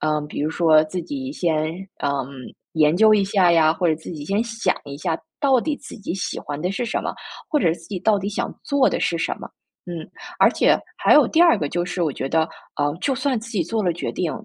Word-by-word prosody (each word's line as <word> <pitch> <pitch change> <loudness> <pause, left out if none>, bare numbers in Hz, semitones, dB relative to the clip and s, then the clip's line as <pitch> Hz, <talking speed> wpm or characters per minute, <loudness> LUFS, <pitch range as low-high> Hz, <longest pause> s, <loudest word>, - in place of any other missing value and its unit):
嗯， 150 -1 0
比 - - -5
如 155 - 0
说 160 -2 +4
自 180 +4 -4
己 275 -1 -5
先， 160 - 0 0.3
嗯， 140 - +2 0.6
研 155 0 +4
究 215 +3 +6
一 200 -2 +3
下 190 -3 +3
呀， 160 -2 +5
或 175 +1 0
者 160 - +3
自 165 - -9
己 150 -3 -7
先 200 +8 0
想 230 -1 -1
一 140 0 -8
下 165 -1 -1 0.2
到 270 -3 +4
底 300 +4 -1
自 - - -10
己 205 -5 -5
喜 190 - -3
欢 145 0 -6
的 180 +3 -1
是 240 +5 -2
什 235 - -2
么， - - -3 0.3
或 300 - +2
者 165 - +3
自 165 -1 -10
己 195 -3 -3
到 205 +2 +3
底 195 +1 -3
想 210 - -3
做 280 -2 +3
的 - - -2
是 170 - +1
什 - - -1
么， - - -8 0.4
嗯。 170 -2 -6 0.3
而 - - +6
且 - - +3 0.2
还 - - +5
有 - - +7
第 330 - +2
二 345 -1 +7
个 145 -2 -2
就 175 0 -1
是 180 0 -2
我 155 -4 0
觉 135 - -4
得， 160 +1 +2 0.3
呃， 145 0 0
就 270 - +1
算 260 -3 0
自 230 - -10
己 205 -7 0
做 215 +6 -2
了 175 -2 +1
决 175 - -4
定， 175 -4 -1
175 Hz, 270 characters per minute, -22 LUFS, 160-220 Hz, 0.6 s, 有